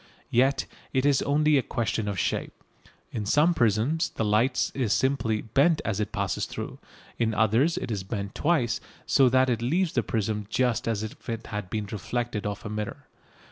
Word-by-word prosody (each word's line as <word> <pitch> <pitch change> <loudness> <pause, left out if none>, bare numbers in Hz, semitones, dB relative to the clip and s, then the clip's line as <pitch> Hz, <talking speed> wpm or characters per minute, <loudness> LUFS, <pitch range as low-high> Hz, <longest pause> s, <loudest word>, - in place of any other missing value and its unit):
Yet 135 +3 +3 0.3
it 130 +1 +2
is 140 -2 +4
only 150 0 +3
a - - +1
question 110 -2 -2
of 100 -2 -2
shape. - - -2 0.5
In 110 - -3
some 150 +11 +4
prisms 120 - +2
the 110 - -2
light 110 +5 +2
is 120 -6 +1
simply 115 -5 +1
bent 140 +8 +3
as 110 -2 -1
it 105 - -2
passes - - -1
through. - - -6 0.4
In 110 -2 +1
others 115 +10 +3
it - - -3
is 100 -3 -1
bent 100 0 -4
twice, 145 -7 +1 0.2
so 135 -2 +5
that 130 +1 +4
it 120 -2 0
leaves 165 +8 +1
the 120 - +2
prism 105 -2 -2
just 125 -2 +1
as 110 -2 0
if 110 - -8
it 115 0 -4
had 105 -4 -5
been 105 0 -2
reflected 110 +2 -3
off 100 +1 -5
a - - -3
mirror. 105 0 -5
115 Hz, 185 wpm, -27 LUFS, 105-135 Hz, 0.5 s, so